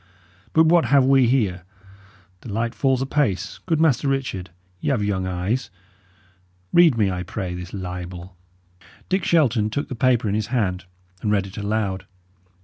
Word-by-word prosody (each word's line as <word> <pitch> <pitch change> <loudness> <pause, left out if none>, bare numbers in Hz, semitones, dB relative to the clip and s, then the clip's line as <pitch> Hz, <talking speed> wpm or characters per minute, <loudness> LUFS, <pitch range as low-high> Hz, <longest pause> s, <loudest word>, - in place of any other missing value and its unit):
But 160 0 +5
what 170 +1 +4
have 140 -2 +4
we 135 -2 +5
here? 105 -8 +1 0.8
The 110 - -9
light 115 +3 -1
falls 135 -2 +1
apace. 135 - -1
Good 165 -3 +1
Master 145 -4 +2
Richard, 130 -9 -2 0.3
y' - - -2
have 125 -7 +1
young 95 -2 -1
eyes. 95 +8 -2 1.0
Read 170 -8 +6
me, 100 -3 +2
I 90 0 -3
pray, 90 0 -4
this 90 0 -7
libel." 90 -1 -7 0.7
Dick 190 -1 +1
Shelton 125 -10 +2
took 140 +7 -3
the - - -4
paper 120 -2 +2
in 100 - 0
his 105 0 -1
hand 95 -7 -1 0.4
and 105 - 0
read 100 -2 +2
it 95 0 -10
aloud. 100 -2 -2
110 Hz, 160 wpm, -22 LUFS, 95-135 Hz, 1.0 s, Read